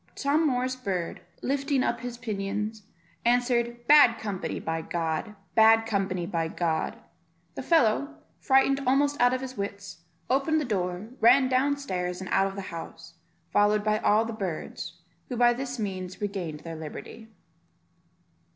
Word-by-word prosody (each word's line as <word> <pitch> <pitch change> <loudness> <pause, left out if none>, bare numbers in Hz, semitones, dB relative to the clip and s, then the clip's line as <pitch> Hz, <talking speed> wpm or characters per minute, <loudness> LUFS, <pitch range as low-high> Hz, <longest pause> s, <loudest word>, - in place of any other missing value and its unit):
Tom 300 +3 +2
Moor's 255 -1 0
bird, 195 -9 -3 0.2
lifting 275 0 0
up 235 - 0
his 245 0 -6
pinions, 210 0 -3 0.4
answered, 240 0 +1
"Bad 285 -5 +7
company, 190 -6 -4
by 165 0 -3
G, 165 +5 -3 0.2
bad 225 0 +6
company, 195 -5 -1
by 165 -1 -1
G 160 -1 -1 0.3
." - - -41
The - - -5
fellow, 285 -1 +2 0.2
frightened 270 +1 +3
almost 285 +1 +2
out 245 0 +5
of 255 0 -1
his 260 -1 -7
wits, 200 0 -5 0.3
opened 280 +4 +2
the 300 - -2
door, 185 -2 -2
ran 255 +3 +6
down 275 +3 +2
stairs, 180 -10 -3
and 190 - -7
out 195 - +4
of 195 - -6
the 200 - -5
house, 165 0 -9 0.4
followed 205 0 +3
by 215 0 +1
all 215 +2 +3
the 230 - -5
birds, 190 -7 -5 0.3
who 250 - -3
by 240 0 +5
this 255 +1 -5
means 190 -4 -4
regained 185 -7 -4
their 165 -1 -7
liberty. 160 +8 -9
220 Hz, 155 wpm, -27 LUFS, 185-255 Hz, 0.4 s, Bad